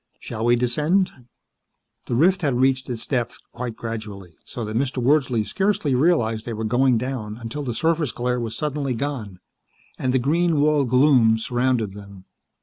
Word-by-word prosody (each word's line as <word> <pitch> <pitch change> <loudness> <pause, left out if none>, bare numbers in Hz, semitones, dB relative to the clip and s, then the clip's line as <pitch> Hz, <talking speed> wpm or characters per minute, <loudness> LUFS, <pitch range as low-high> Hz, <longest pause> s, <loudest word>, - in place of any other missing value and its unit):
Shall 110 +1 -5
we 120 0 +5
descend?" 150 +11 +1 1.0
The 120 - -1
rift 185 +8 +3
had 140 -6 +1
reached 130 0 +2
its 120 -2 -4
depth 120 -3 -2
quite 120 -1 -5
gradually, 105 -6 -7
so 120 - -6
that 110 +1 -5
Mr. 130 +2 -1
Wordsley 125 -3 +2
scarcely 190 - 0
realized 125 -6 +2
that - - -23
they 120 - -4
were 110 +1 -4
going 125 +3 +3
down 110 -3 -4
until 120 +5 -6
the 125 -5 -4
surface 160 -3 +1
glare 125 0 -1
was 115 -1 -4
suddenly 145 -4 -2
gone, 115 -8 -4 0.6
and 130 - 0
the 130 - +3
green 160 +5 +1
walled 145 -3 +2
gloom 125 -4 +5
surrounded 120 -2 0
them. 100 -2 -12
125 Hz, 170 wpm, -23 LUFS, 115-145 Hz, 1.0 s, we